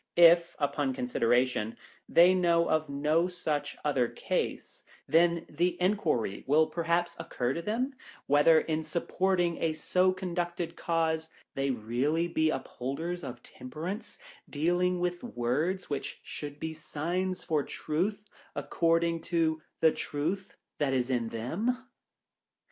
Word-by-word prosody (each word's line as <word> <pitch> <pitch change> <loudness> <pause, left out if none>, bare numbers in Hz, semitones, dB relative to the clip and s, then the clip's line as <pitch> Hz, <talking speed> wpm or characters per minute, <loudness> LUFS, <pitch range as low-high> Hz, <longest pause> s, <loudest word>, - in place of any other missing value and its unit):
If, 170 0 +7
upon 140 -2 0
consideration, 120 -2 +1 0.3
they 175 +2 +7
know 170 -2 +3
of 155 -1 +1
no 150 +5 +2
such 160 -5 -3
other 135 -5 +2
case, - - -3 0.2
then 170 0 +3
the 175 +4 0
enquiry 175 - 0
will 155 +3 +5
perhaps 170 +1 0
occur 130 -6 -2
to 170 - -3
them, 235 +9 -1 0.3
whether, 145 +3 +6
in 160 0 -1
supporting 175 +1 0
a 165 -1 +1
so 185 +4 +2
conducted 175 -2 -3
cause, 160 -1 0 0.2
they 135 0 -1
really 130 +8 0
be 160 -2 +1
upholders 155 +6 -4
of 120 -3 -7
Temperance^ 160 - -7 0.3
dealing 175 +4 +1
with 175 0 -2
words, 160 - -1
which 140 -2 -4
should 145 -1 -7
be 160 - -3
the 155 - -13
signs 180 +5 -2
for 155 -2 +1
Truth, 195 +10 -2 0.3
according 165 0 +1
to 160 -2 0 0.2
the 160 - +6
truth 170 +9 -3 0.2
that 140 -2 +1
is 125 0 0
in 120 -3 0
them 165 - -1
165 Hz, 130 wpm, -30 LUFS, 145-175 Hz, 0.3 s, If